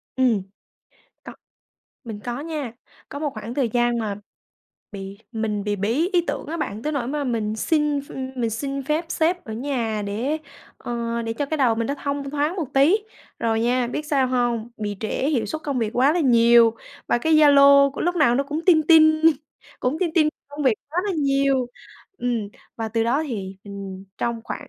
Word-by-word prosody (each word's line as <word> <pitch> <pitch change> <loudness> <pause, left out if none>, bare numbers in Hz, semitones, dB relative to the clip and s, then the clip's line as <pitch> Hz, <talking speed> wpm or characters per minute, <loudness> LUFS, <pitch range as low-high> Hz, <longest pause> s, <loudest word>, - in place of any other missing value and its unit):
Ừm. 245 -6 +2 0.8
Co - - -9 0.7
mình 220 -3 -7
có 240 +2 -4
nha, 300 -6 -4 0.4
có 285 - -6
một 300 -2 -1
khoảng 220 +2 -6
thời 255 -5 0
gian 240 0 +1
mà 210 -3 -2 0.8
bị 195 0 -8
mình 215 -2 -2
bị 205 -1 -1
bí 240 - 0
ý 350 - +4
tưởng - - -3
á 330 +3 -4
bạn 220 -8 -4
tới 305 - -2
nỗi 255 -5 -2
mà 290 0 -2
mình 220 -3 -1
xin 295 +2 +1
ph 280 - -15 0.3
mình 230 -2 0
xin 275 +4 -3
phép 305 +4 -1
sếp 350 +1 0
ở 220 - -7
nhà 230 -4 -2
để, 250 +10 -2 0.4
ờ, 235 -1 -3
để 225 0 -3
cho 285 +4 -3
cái 315 - -2
đầu 250 -5 +3
mình 230 0 -2
nó 280 - -1
thông 280 -1 -2
thoáng 295 +5 -1
một 325 -6 -2
tí, 290 +9 +5 0.4
rồi 225 -1 0
nha, 245 +1 +1
biết 300 +5 -4
sao 275 -4 +2
hông? 240 -2 0
Bị 205 -2 -4
trễ 225 +5 -1
hiệu 235 -7 0
suất 310 +9 -5
công 280 -3 -2
việc 225 -3 0
quá 265 +5 +3
là 350 - +1
nhiều, 235 -3 +5 0.3
và 240 - +2
cái 320 +5 +2
Zalo 280 -2 +7
của 280 - -8
lúc 355 +1 0
nào 265 -7 +4
nó 275 +2 +1
cũng 305 +3 -4
tinh 320 -4 +6
tinh, 315 -1 +6 0.6
cũng 255 +5 0
tinh 345 -3 +1
tinh 310 -3 +4 0.2
công 290 +1 -6
việc 255 -5 +4
quá 330 +4 -3
là 400 - -1
nhiều. 275 -3 +2 0.5
Ừm, 235 -4 -1 0.3
và 225 -1 -3
từ 225 +1 0
đó 270 +7 +1
thì, 195 -6 -5
ừm, 195 -1 -8
trong 235 -1 -2
khoảng - - -6
255 Hz, 200 wpm, -23 LUFS, 225-295 Hz, 0.8 s, Zalo